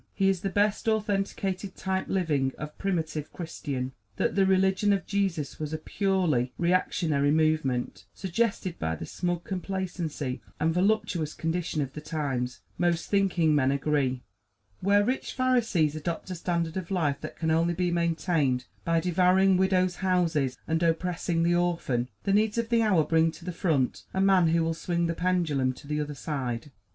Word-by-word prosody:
He 195 -1 +3
is 190 -3 0
the 195 - -1
best 205 +2 +1
authenticated 200 -3 -1
type 190 0 -2
living 150 -8 +1
of 150 0 -7
primitive 160 -6 -2
Christian. 140 -6 -4 0.2
That - - 0
the 195 -1 +3
religion 190 +2 +3
of 195 -2 -1
Jesus 190 -7 -1
was 155 0 -4
a - - 0
purely 160 - 0
reactionary 170 -5 +1
movement, 145 - +1
suggested 190 -1 -1
by 80 0 -1
the 80 - -6
smug 175 - -2
complacency 180 -8 -3 0.2
and 160 +1 +2
voluptuous 180 -4 +1
condition 165 -2 -1
of 135 0 -7
the 150 - -7
times, 140 -5 -3 0.2
most 175 -1 0
thinking 185 -6 +3
men 135 -2 +3
agree. 140 -3 0 0.6
Where 200 +2 +4
rich 255 +3 -2
Pharisees 230 - +2
adopt 165 +4 -4
a - - -3
standard 170 -1 -2
of 185 -3 -4
life 155 -7 0
that 155 - -7
can 160 -1 0
only 165 +2 +2
be 180 0 0
maintained 165 -6 +1 0.2
by 165 -1 +2
devouring 185 +2 +4
widows' 185 -1 +2
houses 170 -9 +1
and 160 +1 0
oppressing 170 0 0
the 170 +1 +3
orphan, 170 -9 0
the 195 - +1
needs 215 +2 +2
of 230 -1 -1
the 235 -1 +3
hour 195 -8 +4
bring 160 +1 +3
to 170 - -13
the 180 - -3
front 160 -7 0
a - - +1
man 190 -3 +5
who 165 +1 +3
will 165 0 0
swing 170 +1 -1
the 165 - 0
pendulum 165 -8 +1
to 140 - -14
the 150 0 -1
other 150 0 -4
side. 135 -3 -4
170 Hz, 170 wpm, -28 LUFS, 150-190 Hz, 0.6 s, man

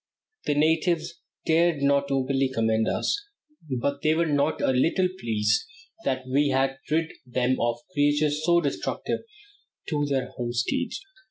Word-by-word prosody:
The 145 - +2
natives 165 +2 +1 0.3
dared 165 -2 +3
not 140 0 +3
openly 135 0 +1
commend 110 -2 +1
us, 410 - 0 0.6
but 140 +2 -1
they 155 +1 +3
were 170 +1 +2
not 145 0 +1
a - - +2
little 165 +8 +2
pleased 110 - +1 0.4
that 130 0 0
we 140 +3 +2
had 135 0 +1
rid 160 +1 +1
them 125 0 0
of 120 0 +1 0.2
creatures 145 +1 +2
so 170 +1 +4
destructive 140 -4 -2 0.7
to 145 -2 0
their 135 -2 -1
homesteads. 120 0 -1
140 Hz, 140 wpm, -26 LUFS, 130-155 Hz, 0.7 s, so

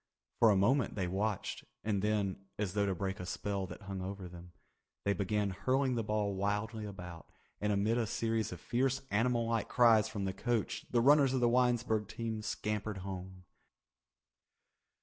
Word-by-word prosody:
For 115 - +7
a 105 - +5
moment 120 +8 +2
they 95 -3 -1
watched 100 +3 -2 0.2
and 105 -2 0
then, 100 -2 0
as 100 -3 -2
though 100 -1 +1
to 95 - 0
break 95 +1 -3
a 90 - -5
spell 100 0 -2
that 105 - -10
hung 95 -1 -5
over 95 0 -5
them, 90 0 -11 0.5
they 100 - +3
began 100 +1 0
hurling 130 +7 +1
the 115 -2 0
ball 105 -1 0
wildly 105 +3 -1
about, 90 -4 -9 0.3
and 105 0 0
amid 105 +4 +2
a 115 - 0
series 115 0 -1
of 90 - -7
fierce 130 +6 0
animal 115 +2 +2
like 115 -2 0
cries 115 -4 +5
from 100 -3 -3
the 95 - -1
coach, 115 +2 -1
the 120 - +3
runners 140 0 +5
of - - +2
the 120 - +4
Winesburg 120 -3 +2
team 110 0 -4
scampered 105 -1 -3
home. 95 -1 -7
105 Hz, 175 wpm, -33 LUFS, 95-115 Hz, 0.5 s, For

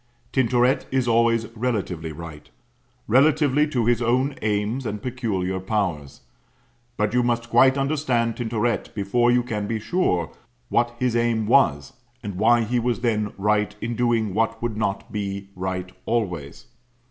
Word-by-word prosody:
Tintoret 130 +1 +2
is 130 -2 0
always 115 -1 +3
relatively 105 -9 -3
Right 75 -1 -10 0.6
relatively 145 +3 +4
to 125 -6 -1
his 120 0 +2
own 130 +4 +1
aims 105 +4 -1
and 105 0 -4
peculiar 105 -7 -2
powers. 95 -8 -3 0.8
But 105 0 0
you 125 - +3
must 120 -1 -1
quite 130 +1 +5
understand 135 -5 0
Tintoret 115 -1 -2
before 120 +4 +1
you 125 0 +3
can 105 -4 -3
be 115 0 -2
sure 105 - 0 0.4
what 120 0 +1
his 125 -1 0
aim 115 -2 +1
was, 75 - +3 0.3
and 105 -2 -4
why 115 +5 +3
he 120 +3 0
was 120 0 -1
then 110 -4 0
right 105 +1 +1
in 115 +2 -3
doing 115 -4 +1
what 115 +2 0
would 115 -2 -3
not 100 -2 -2
be 100 -1 -4
right 90 0 -4 0.2
always. 90 - -2
115 Hz, 145 wpm, -23 LUFS, 100-120 Hz, 0.8 s, quite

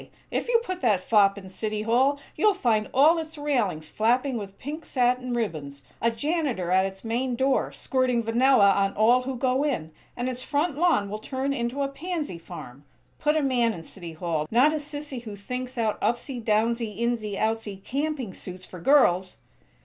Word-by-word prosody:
If - - -1
you 475 -1 +4
put 370 -4 -5
that 215 -7 +3
fop 200 -1 +4
in 190 -1 -9
City 210 +2 -3
Hall 260 +6 +3 0.2
you'll 415 +5 +3
find 220 - +1
all 310 +6 +5
its 320 0 -7
railings 235 - -1
flapping 245 - +1
with 200 -3 -6
pink 305 +4 -6
satin 250 -1 0
ribbons; 155 -12 -3 0.2
a 230 - +3
janitor 245 - -1
at 190 +1 +4
its 190 0 -9
main 240 +2 -1
door, 265 +2 +1
squirting 255 -3 0
vanilla 230 -2 +5
on 195 0 +1
all 235 +4 +5
who 260 +1 -4
go 260 +2 +1
in; 170 - -2 0.3
and 245 +1 -2
its 255 -1 -3
front 295 +3 0
lawn 320 - +2
will 210 +2 -5
turn 265 +4 -2
into 250 +2 -2
a - - 0
pansy 295 - -4
farm! 145 -6 -10 0.4
Put 300 +1 +2
a 305 - +1
man 245 -4 +2
in 165 - -8
City 170 -1 -9
Hall, 160 -2 -2
not 260 +7 +4
a - - 0
sissy 290 -3 -6
who 215 -3 -8
thinks 250 +5 -6
out 220 -2 0
'upsy 240 +1 -1
downsy, 220 0 0
insy 230 -4 -1
outsy' 220 -3 -2
camping 280 -6 -2
suits 185 0 -8
for 180 - -10
girls!" 185 - +3
240 Hz, 185 wpm, -26 LUFS, 200-275 Hz, 0.4 s, all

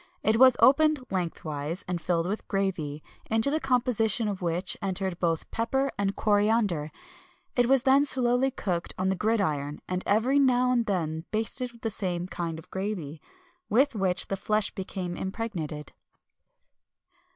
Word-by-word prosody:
It 220 +1 +3
was 255 0 +7
opened 305 +3 +5
lengthwise, 165 -3 -3
and 175 -2 -2
filled 170 -1 0
with 205 +4 -2
a - - -25
gravy, 170 -7 -2 0.3
into 225 +5 +1
the 310 - +1
composition 245 -5 +2
of 200 -2 -3
which 175 +1 0
entered 190 -2 -2
both 165 -2 -1
pepper 265 +4 0
and 200 -1 -1
coriander. 205 -7 +1 0.6
It 245 -1 +3
was 265 -1 +3
then 275 +1 +5
slowly 255 -1 +2
cooked 180 -9 -3
on 185 +1 0
the 190 - +1
gridiron, 155 -10 0
and 180 0 -2
every 245 +7 +3
now 250 -2 +3
and 240 -2 +1
then 160 -4 -2
basted 225 +3 -2
with 235 -1 -19
the 225 - -2
same 180 -4 -2
kind 170 -2 -4
of 160 - -13
gravy, 185 -7 -4 0.5
with 270 +5 +3
which 190 -4 +1
the 195 - -2
flesh 210 +2 0
became 185 -2 -5
impregnated. 185 -8 -5
200 Hz, 155 wpm, -27 LUFS, 175-240 Hz, 0.6 s, was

